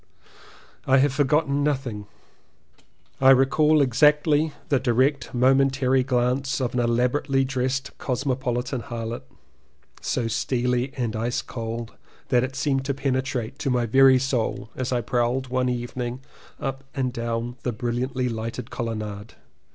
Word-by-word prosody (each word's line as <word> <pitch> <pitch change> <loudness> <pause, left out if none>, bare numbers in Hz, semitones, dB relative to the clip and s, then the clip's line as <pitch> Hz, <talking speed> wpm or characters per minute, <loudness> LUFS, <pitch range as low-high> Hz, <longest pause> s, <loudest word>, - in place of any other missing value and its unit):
I 130 - +5
have 135 0 +3
forgotten 145 0 +2
nothing. 130 -8 -2 1.1
I 130 - +6
recall 145 +4 +5
exactly 150 +4 +3 0.2
the 140 - +3
direct 130 +3 +1
momentary 135 +1 +3
glance 125 +1 0
of 125 -2 -1
an 125 - 0
elabora 120 +4 +1
tely 135 -1 +2
dressed 130 +1 -2
cosmopolitan 125 -1 -2
harlot 115 0 -5 0.5
— - - -39 0.3
so 120 - -1
steely 125 +2 0
and 120 -3 -2
ice 115 +3 -1
cold 115 -1 -5 0.4
that 125 -2 +3
it 130 0 -4
seemed 140 -1 0
to 140 0 -1
penetrate 130 -2 -2
to 135 - -1
my 125 -2 +1
very 130 +3 +6
soul 125 -4 -2
as 130 0 -3
I 125 -1 +1
prowled 125 +2 0
one 125 0 +1
evening 120 +1 -4 0.4
up 135 0 -4
and 130 -3 -1
down 115 +1 -3
the 125 - -1
brilliantly 125 +3 -2
lighted 115 +1 -5
colonnade. 110 -3 -5
130 Hz, 135 wpm, -24 LUFS, 120-135 Hz, 1.1 s, I